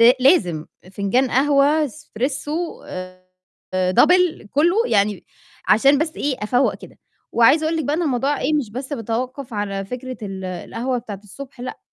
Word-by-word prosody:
ل 235 +2 +8
لازم 180 - +3 0.3
فنجان 240 +7 +1
قهوة 290 +3 +3
Espresso 290 +5 -4
آآ، 185 0 -8 0.5
Double 315 - +3
كلّه 335 +7 +3
يعني، 205 -1 +1 0.4
عشان 275 +5 +5
بس 315 0 -2
إيه 280 -2 -1
أفوَّق 245 +5 +2
كده، - - -14 0.3
وعايزة 270 +7 +5
أقول 325 +1 0
لِك 315 - -1
بقى 290 - 0
إن 350 - 0
الموضوع 275 0 0
إيه 305 +3 +1
مش 265 -8 -1
بس 260 +5 -6
بتوقف 245 +1 -4
على 200 -1 -2
فكرة 250 +4 -6
ال 190 -2 -6
القهوة 230 +7 -3
بتاعة 205 -4 -8
الصبح، 260 +5 -11
لأ، 250 - -6
255 Hz, 155 wpm, -21 LUFS, 205-290 Hz, 0.5 s, ل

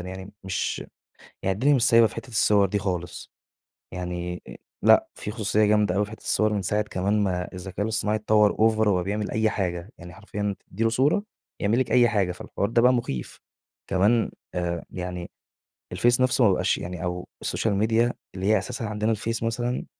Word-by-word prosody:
يعني 95 +2 -8
مش 95 -1 -2 0.6
يعني 95 - +1
الدنيا 135 +9 +3
مش 130 - +2
سايبة 115 -1 +6
في 110 - -6
حتّة - - -7
الصور 105 -3 +3
دي 105 - 0
خالص. 90 -4 -4 0.6
يعني 90 -1 -4
أ - - -9 0.3
لأ - - +6
في 105 - -5
خصوصية 105 -1 +1
جامدة 105 -3 +2
أوي 105 +1 +2
في 105 - -13
حتّة 110 - -11
الصور 110 0 +2
من 105 - 0
ساعة 105 +3 0
كمان 100 +1 0
ما 90 -2 -1
الذكاء 95 +2 -5
الاصطناعي 110 -1 +1
أتطوّر 105 -1 +3
over 110 0 +3
وبقى 90 -3 +2
بيعمل 105 +2 -3
أي 110 0 +2
حاجة. 90 -2 -3
يعني 85 +1 -11
حرفيًا 105 0 -4 0.2
تدّي 110 +5 -2
له 115 - +3
صورة، 140 - +2 0.4
يعمل 110 +4 +1
لِك 130 - -1
أي 120 -2 +5
حاجة، 100 -5 +1
فالحوار 100 +3 -3
ده 115 +1 +3
بقى 125 +1 +5
مٌخيف. 70 - -3 0.5
كمان 105 +5 +2 0.2
آآ 85 -1 -2
يعني 90 -1 -5 0.6
الفيس 120 +7 +2
نفسه 130 0 +3
ما 100 - +6
بقاش 95 - +1
يعني 90 0 -6
أو 90 0 -3
السوشيال 110 - -1
ميديا 115 +3 +2 0.2
اللي 95 0 -4
هي 110 +2 +4
أساسًا 115 +4 -4
عندنا 105 0 -1
الفيس 115 +1 -2
مثلًا 120 +2 -2
105 Hz, 190 wpm, -25 LUFS, 90-115 Hz, 0.6 s, سايبة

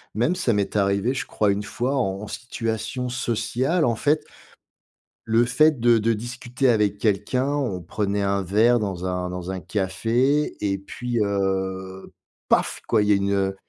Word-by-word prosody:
même, 120 +11 +2
ça 150 -11 +1
m'est 100 0 -1
arrivé, 100 +4 +2
je 135 - -4
crois, 105 -2 +1
une 100 +1 -1
fois 125 +6 -2
en 100 -4 -1
situation 120 +2 -4
sociale. 125 +7 0
En 120 - +2
fait 150 +6 +1 1.0
le 115 +2 +3
fait 155 +3 +3
de 120 -1 +4
de 115 +2 +1
discuter 120 +3 -2
avec 105 -3 +2
quelqu'un, 105 +6 0
on 130 -11 -1
prenait 100 +3 -2
un 100 0 +1
verre 110 +6 +3
dans 95 -4 -3
un 90 0 -2
dans 90 0 -5
un 95 -2 -5
café 115 - 0
et 100 -1 0
puis, 120 +4 -4
heu, 95 -1 -2 0.4
paf, - - +1
quoi, 110 -2 +3
il 105 - 0
y - - +6
a - - +5
une, 100 0 0
heu, 95 -1 0
105 Hz, 170 wpm, -24 LUFS, 100-120 Hz, 1.0 s, y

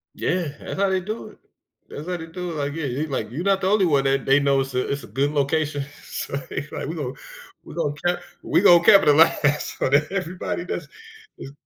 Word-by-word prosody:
Yeah, 175 -3 -1
that - - -6
how 195 0 +2
they 190 -1 +1
do 215 +5 -5
it. - - -18 0.5
That's 150 +4 -8
how 180 - -2
they 165 - -7
do 180 +1 -5
it, 160 - -6
like, 145 -1 -2
yeah, 165 -2 -3
you 140 +4 -2
like, 130 -7 -3
"You 160 +8 -4
not 195 -1 +2
the 185 - +1
only 205 -2 +4
one 140 -5 +2
that 135 -1 +1
they 135 +1 +5
know" 140 -1 +2
it's 135 0 -5
a 125 0 -1
it's 140 -2 -3
a - - -10
good 135 +8 0
location. 145 0 0 0.2
So - - -5
they - - -4
like - - -5
"we 165 - -4
gonna, 135 -4 -4 0.5
we - - -11
gonna 145 -4 -1
ca 175 0 +2 0.2
we - - +2
gonna 175 -4 +7
capitalize 150 -5 +5
so - - 0
that 145 +3 +3
everybody 180 -1 -3
does - - -4 0.5
is" 135 - -9
150 Hz, 230 wpm, -23 LUFS, 140-180 Hz, 0.5 s, gonna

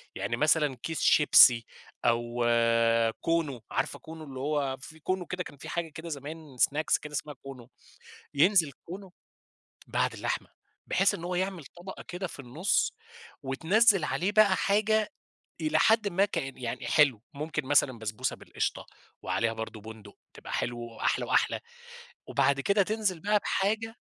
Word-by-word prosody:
يعني 115 - -2
مثلًا 150 -1 +2
كيس 160 -1 -3
شيبسي 125 -6 +7 0.4
أو 120 0 +1 0.8
كونو، 160 -7 -1
عارفة 135 +3 -2
كونو؟ 160 0 -10
اللي 135 -3 -8
هو 140 -2 -1
في 160 +4 -12
كونو 185 +3 -2
كده، 180 +1 -4
كان 145 - -12
في - - -9
حاجة 170 -1 -3
كده 160 +2 -9
زمان 150 -1 -8
سناكس 150 +5 +2
كده 150 - -10
اسمها 150 0 -4
كونو، 130 -3 -10 0.6
ينزِل 165 +1 +4
كونو 185 +1 -9 0.7
بعد - - 0
اللحمة - - -3 0.4
بحيث 195 +1 +2
إن 170 - -7
هو 180 +1 -3
يعمل 185 -3 -2
طبقة 175 +6 -10
كده 180 +1 -4
في 145 - -9
النُّص، 140 +10 0 0.5
وتنزِّل 185 - +3
عليه 185 +6 -1
بقى 210 -3 +5
حاجة 215 +1 +2 0.5
إلى 310 - +1
حدٍّ 220 -2 +4
ما 195 +1 +2
كان 135 -9 -4
يعني 125 0 -5
حلو، 135 -8 +3
ممكن 150 -1 -4
مثلًا 130 -3 +3
بسبوسة 110 +4 -3
بالقشطة - - -4 0.4
وعليها 115 0 0
برضه 110 -1 -6
بُندُق، 110 -1 -12 0.2
تبقى - - -10
حلو 120 0 -2
وأحلى 115 -1 -2
وأحلى. - - +1 0.7
وبعد 140 0 +2
كده 200 +6 +3
تنزِل 210 -3 -1
بقى 210 +5 +2
بحاجة 220 +4 -1
155 Hz, 150 wpm, -28 LUFS, 130-190 Hz, 0.8 s, شيبسي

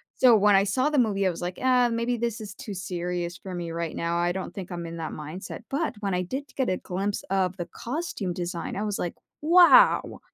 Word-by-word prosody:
so 245 -3 +6
when 205 -1 +5
I 195 +1 +4
saw 255 +9 +1
the 295 -3 +2
movie, 200 -4 +2
I - - +3
was 175 - -5
like, 180 +1 -4
"Uh, 250 -1 +4
maybe 235 +1 -1
this 235 -1 -2
is 200 -1 -7
too 205 - -7
serious 175 -1 -3
for 185 -2 -7
me 170 -1 -4
right 165 -1 -3
now, 170 0 -1
I 175 0 +1
don't 190 - -5
think 190 -2 -7
I'm 170 -1 -4
in 165 0 -7
that 160 -1 -4
mindset," 155 +9 -7
but 295 0 -1
when 195 -2 -1
I 180 0 0
did 265 +10 -4
get 260 -5 +1
a 185 - +1
glimpse 195 +3 -3
of 190 -1 +1
the 175 -1 -4
costume 240 - -3
design, 175 -2 -4
I 205 - -2
was 205 -2 -2
like, 175 - -3 0.3
"Wow!" 350 +9 +6
195 Hz, 240 wpm, -26 LUFS, 175-235 Hz, 0.3 s, so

